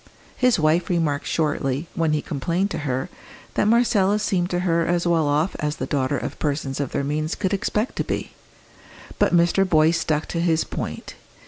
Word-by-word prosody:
His 250 -3 +3
wife 160 +3 +2
remarked 160 -5 0
shortly, 145 -2 -1
when 165 -2 +1
he 150 - 0
complained 170 +7 -1
to - - -3
her, 130 +1 -1 0.5
that - - +1
Marcella 215 -3 +3
seemed 185 -4 0
to 175 -1 -1
her 170 -2 +2
as 175 +1 0
well 165 -3 +2
off 150 +5 +1
as 150 -1 -1
the - - -4
daughter 140 0 0
of - - -5
persons 140 -2 -2
of 140 -3 -2
their 140 - -1
means 155 +3 -2
could 195 0 -1
expect 210 +4 -1
to - - +1
be. - - -4 0.9
But - - +3
Mr. 175 +3 +4
Boyce 165 -2 +3
stuck 155 -1 0
to 170 - -2
his 165 -2 +2
point. - - -6
165 Hz, 190 wpm, -23 LUFS, 150-180 Hz, 0.9 s, Mr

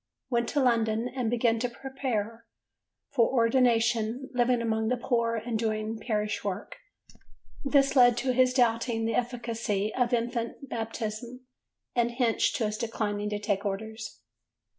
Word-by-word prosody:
Went 235 -1 +1
to 290 - 0
London 230 -3 +2
and 250 -3 -2
began 230 -1 +2
to 245 +1 -1
prepare 235 -3 -4 0.6
for 235 -5 +3
ordination, 235 0 +2
living 245 0 +2
among 220 -1 0
the 250 +2 +1
poor 235 -1 0
and 225 0 -2
doing 220 0 -2
parish 210 -2 -2
work: 200 - -4 0.9
this 275 0 +3
led 245 -2 +6
to 255 +1 0
his 255 0 +4
doubting 230 -2 +1
the 225 - 0
efficacy 230 -4 -1
of 245 -1 +1
infant 240 +2 -2
baptism 225 +1 -5 0.5
and 240 -1 +2
hence 240 -2 +2
to 230 - 0
his 215 0 -3
declining 210 -3 -2
to 210 - -2
take 205 -1 -1
orders. 220 - -5
230 Hz, 140 wpm, -28 LUFS, 220-245 Hz, 0.9 s, led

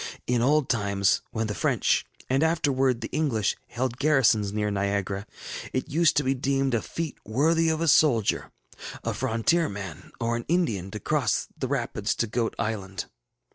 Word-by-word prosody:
In 120 -1 +1
old 145 +3 +3
times, 100 -4 +1
when 110 0 -2
the 105 - -2
French, - - +1 0.2
and 135 +2 +1
afterwards 135 -6 +2
the 115 - -3
English, 125 -10 +1
held 125 0 -2
garrisons 130 -9 +3
near 105 0 -1
Niagara, 100 0 -1 0.5
it 130 - -2
used 165 +2 +3
to 145 - +3
be 135 0 +2
deemed 135 0 0
a 115 - +2
feat 165 -4 -5
worthy 160 +9 +2
of 160 0 0
a 165 - +1
soldier, 135 -8 +3 0.5
a - - -1
frontier 130 +8 +1
man, 100 -1 -8
or 115 0 0
an 120 - -4
Indian, 115 - 0
to 105 - -6
cross - - 0
the - - -3
rapids - - -1
to - - 0
Goat 115 +1 -2
Island. 100 -2 -3
120 Hz, 170 wpm, -26 LUFS, 105-145 Hz, 0.5 s, old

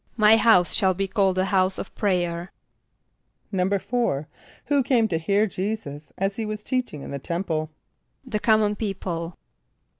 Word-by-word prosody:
="My 215 0 +7
house 220 -6 +4
shall 190 -3 +2
be 195 +1 -1
called 195 -2 +1
a 185 - +2
house 190 -1 +2
of - - -7
prayer."= 175 -3 -1 1.0
=4.= 195 - 0 0.4
Who 285 -1 +2
came 240 -3 +2
to 165 -4 0
hear 200 +6 +2
J[=e]´[s+]us 185 -8 -5
as 195 +1 -1
he 225 - -2
was 215 0 -5
teaching 245 - -2
in - - -8
the 140 - -4
temple? 160 -1 -2 0.6
=The 225 -5 -2
common 215 -1 +3
people. 180 -5 -4
195 Hz, 150 wpm, -24 LUFS, 175-215 Hz, 1.0 s, ="My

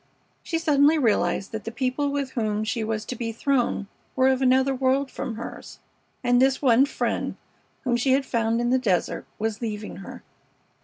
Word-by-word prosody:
She 330 - -2
suddenly 305 -1 +4
realized 220 -6 +1
that 220 -1 -5
the 225 - -5
people 260 +3 -1
with 280 -2 -2
whom 215 -3 -1
she 220 +1 -2
was 220 0 -2
to 250 - -5
be 230 -1 -3
thrown 245 -3 0 0.3
were 260 0 +4
of 265 0 +1
another 265 +1 +3
world 265 +1 +1
from 230 - -4
hers, 230 - -8 0.5
and 245 0 +3
this 265 0 +3
one 260 0 +4
friend - - -2 0.5
whom 245 -2 +1
she 260 +2 +2
had 270 0 +2
found 230 -1 0
in 240 0 0
the 260 - +4
desert 185 -8 -1
was 220 +1 -2
leaving 210 -2 -5
her. 195 - -10
250 Hz, 185 wpm, -25 LUFS, 225-270 Hz, 0.5 s, suddenly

